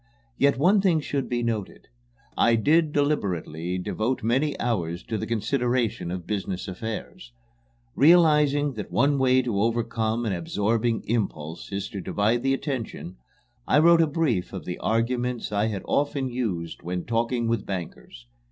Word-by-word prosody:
Yet 140 +1 +3
one 190 +8 +4
thing 180 -5 +3
should 140 -2 -3
be 120 -1 -1
noted: 110 -4 -4 0.5
I 115 - +4
did 155 +7 +3
deliberately 90 - -1
devote 110 +7 -2
many 135 +6 +1
hours 90 -8 -2
to 110 - -4
the - - -3
consideration 120 -2 0
of 90 -1 -5
business 95 -2 -3
affairs. 95 - -6 0.6
Realizing 150 -3 +4
that 105 -4 -7
one 140 +2 +2
way 130 0 +4
to 110 -5 -1
overcome 115 0 0
an 105 - 0
absorbing 110 +6 0
impulse 85 -9 -3
is 100 0 -3
to 100 - -6
divide 110 +6 0
the 135 +1 +2
attention, 120 - -5 0.5
I - - +4
wrote 165 +2 +6
a 165 - +3
brief 145 - -1
of 95 - -6
the 90 - -5
arguments 120 +1 -1
I 105 +1 +1
had 100 -4 -4
often 140 -2 0
used 95 -10 -3
when 90 0 -4
talking 115 +1 0
with 115 -3 -1
bankers. 85 -9 -7
115 Hz, 150 wpm, -25 LUFS, 100-135 Hz, 0.6 s, wrote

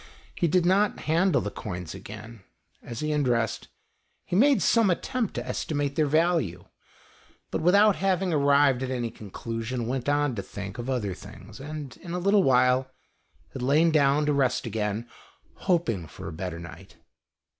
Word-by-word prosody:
He 170 - 0
did 175 +2 +2
not 200 +3 +2
handle 165 +1 +2
the 105 - -4
coins 90 -5 -6
again. 110 +1 -10 0.4
As 120 -1 -7
he 155 0 -1
undressed, 120 -7 0 0.6
he 175 - -3
made 275 +6 +4
some 230 -4 +4
attempt 230 +5 -1
to - - -4
estimate 145 -2 -2
their 155 -2 +2
value, 155 - +1 0.9
but - - -1
without 200 +4 +5
having 190 -2 +1
arrived 140 -3 +4
at 130 - -2
any 120 -3 -2
conclusion, 115 +3 -5
went 130 +3 -2
on 145 -2 +2
to 105 - -3
think 100 +2 -8
of 120 +2 -4
other 110 -7 -1
things, - - -12
and 145 -1 -7
in 170 - -8
a - - -1
little 200 +3 +3
while 125 -2 +3 0.6
had 130 - -6
lain 150 +6 +3
down 145 -1 +3
to 150 - +2
rest 130 -3 +1
again, 110 0 -2 0.5
hoping 115 - 0
for - - -9
a 85 - -6
better 90 +1 -5
night. 85 0 -11
140 Hz, 165 wpm, -26 LUFS, 115-170 Hz, 0.9 s, without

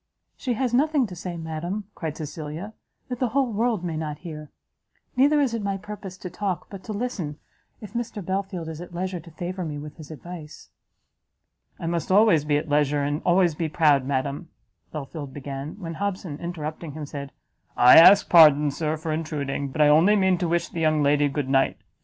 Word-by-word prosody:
"She 250 - -2
has 245 +1 -1
nothing 290 +1 +3
to 185 -5 -8
say, 175 0 -6
madam," 165 +5 -4
cried 155 -2 -5
Cecilia, 155 +6 -6 0.3
"that 250 -2 -5
the 255 - +1
whole 255 0 0
world 220 -3 0
may 170 -3 -3
not 155 -1 -4
hear. 150 -3 -7 0.7
Neither 285 +4 +4
is 270 -5 +1
it 230 - -2
my 200 -1 -2
purpose 200 -2 -8
to 185 - -7
talk, 185 -2 -3
but 195 -2 -9
to 220 - -5
listen, 205 -9 -3 0.4
if 210 - -10
Mr 235 -5 -4
Belfield 190 -3 -3
is 160 0 -6
at 175 0 -10
leisure 185 0 -3
to 170 +1 -13
favour 180 +3 -5
me 150 -3 -4
with 150 0 -9
his 155 -3 -11
advice." 160 0 -10 1.1
"I - - -5
must 170 +1 -2
always 190 -7 +5
be 145 -1 +2
at 155 +2 -3
leisure, 145 -1 +2
and 145 +2 -1
always 175 -1 +3
be 160 +1 -2
proud, 150 -4 +3
madam," 140 +5 -2 0.4
Belfield 145 -1 -7
began, 140 +1 -6
when 165 -4 -5
Hobson, 185 -4 -4
interrupting 160 -2 -5
him, 155 0 -6
said, 140 -1 -7 0.5
"I 125 +1 +8
ask 190 +5 +8
pardon, 150 -3 +7
Sir, 155 +2 -2
for 160 +1 -4
intruding, 145 -3 -3
but 150 +3 -2
I 150 - +7
only 165 +8 +5
mean 190 -3 +3
to 175 - 0
wish 170 0 +1
the 170 - -6
young 155 -2 +2
lady 145 0 +3
good 140 -1 -2
night. 135 0 +2
165 Hz, 195 wpm, -25 LUFS, 150-195 Hz, 1.1 s, I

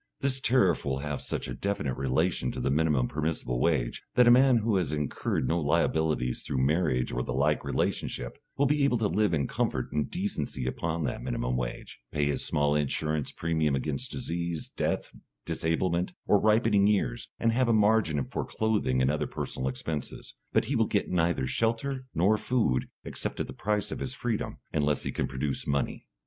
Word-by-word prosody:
This 135 -1 0
tariff 110 -10 +3
will 65 -1 -1
have 75 -2 -3
such - - -3
a 65 - -4
definite 75 -2 -2
relation 65 +1 0
to - - -5
the 70 - 0
minimum 75 -4 +2
permissible 75 -5 -2
wage, 70 -6 +1
that 125 -1 +6
a - - +9
man 130 0 +6
who 110 -2 +1
has 85 -7 0
incurred 75 -3 -1
no 85 +4 +1
liabilities 80 -4 +1
through 65 -1 0
marriage 75 -5 +1
or 60 - -1
the 60 0 -3
like 75 +3 +2
relationship, - - -2 0.2
will 140 - +3
be 145 +1 +2
able 140 -3 +3
to 110 -2 +1
live 105 -1 +2
in 75 -5 +1
comfort - - -1
and 75 -1 -1
decency 65 - -3
upon 80 +5 -2
that 65 - -2
minimum - - -2
wage, - - -4
pay 75 -1 +1
his 70 - 0
small 75 0 +2
insurance 75 0 0
premium 80 -3 0
against 70 +1 -2
disease, 85 -1 -3
death, - - -2 0.3
disablement, 85 +2 0
or 105 - +4
ripening 105 -2 +4
years, 95 -13 0
and 115 - +2
have 125 +2 +2
a - - +5
margin 105 -9 +3
for - - -3
clothing 100 -13 0
and 65 - +3
other 75 - -1
personal 65 +1 -3
expenses. 70 +3 -5 0.2
But - - +2
he - - -1
will - - +3
get - - 0
neither 85 -6 +1
shelter 120 - -1
nor 100 +6 +3
food, 110 - +1
except - - -4
at - - 0
the - - -8
price 105 0 -1
of - - -4
his 130 - -3
freedom, 120 -4 -2 0.2
unless 75 0 +1
he - - -2
can - - -1
produce 65 +1 -3
money. 70 -1 -1
80 Hz, 185 wpm, -28 LUFS, 70-105 Hz, 0.3 s, a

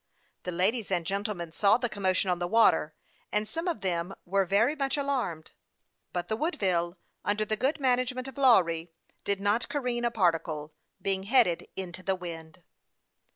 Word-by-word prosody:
The 180 - -2
ladies 200 +6 0
and 175 -3 0
gentlemen 195 -3 -3
saw 200 +5 +4
the 245 - -1
commotion 190 -3 +1
on 175 - -1
the 175 - -1
water, 210 -7 +3 0.4
and 210 0 0
some 330 +7 -4
of 335 - -2
them 180 0 -2
were 195 +2 +1
very 220 - +2
much 275 -1 0
alarmed; 255 - -2 0.6
but 175 -1 -3
the 220 - -1
Woodville, 185 - 0 0.3
under 210 +2 0
the 215 - 0
.good 270 +7 0
management 255 -1 +1
of 270 +1 -9
Lawry, 175 -10 +4 0.3
did 200 -1 +1
not 205 +4 +1
careen 250 -4 -1
a 240 - +3
par 195 -7 +3
ticle, 155 -2 -5 0.3
being 195 -1 0
headed 195 -5 +3
into 185 -1 -5
the 190 +1 0
wind. 165 -2 -9
200 Hz, 170 wpm, -29 LUFS, 175-240 Hz, 0.6 s, saw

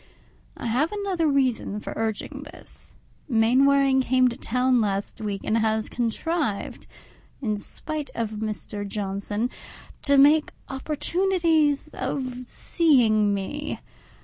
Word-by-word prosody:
I - - -7
have 255 +8 +1
another 390 -6 -1
reason 260 -7 +1
for - - -6
urging 220 -2 -3
this: - - -14 0.3
Mainwaring 265 +3 +4
came 255 0 +3
to 240 - -6
town 250 +1 +1
last 200 0 -2
week, 205 -2 -3
and 225 +1 +1
has 220 0 +1
contrived, 240 - -2 0.5
in 215 -6 -1
spite 300 +7 -4
of 225 -2 -2
Mr. 215 -1 -4
Johnson, 205 +3 -2 0.5
to 280 -1 +3
make 295 +2 +5 0.2
opportunities 315 +1 +1
of 255 -2 -4
seeing 235 -13 +3
me. 245 +10 -4
255 Hz, 115 wpm, -25 LUFS, 215-290 Hz, 0.5 s, make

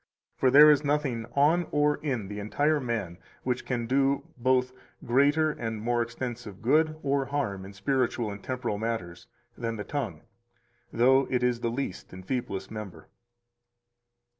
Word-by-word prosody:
For 130 - +3
there 150 +3 +9
is 145 0 +3
nothing 140 -6 -1
on 155 +5 +3
or 150 0 +2
in 120 -10 -3
entire 145 +10 0
man 110 -9 -3 0.2
which 125 -1 -2
can 120 -2 -1
do 135 +3 +2
both 130 +1 +2 0.3
greater 145 +5 +3
and 115 -5 -4
more 120 +2 0
extensive 115 -3 -5
good 155 +5 +3
or 140 -1 +1
harm 130 -10 -2
in 100 - -10
spiritual 120 +1 0
and 100 - -7
in - - -22
temporal 125 -5 -3
matters 110 -7 -4 0.3
than 115 -1 -3
the 105 - -5
tongue, 110 - -4 0.7
though 130 +3 +4
it 125 -1 0
is 125 -1 +1
the 120 - -1
least 120 -8 -5
and 95 0 -10
feeblest 100 -7 -3
member. 100 -7 -8
125 Hz, 155 wpm, -28 LUFS, 110-140 Hz, 0.7 s, there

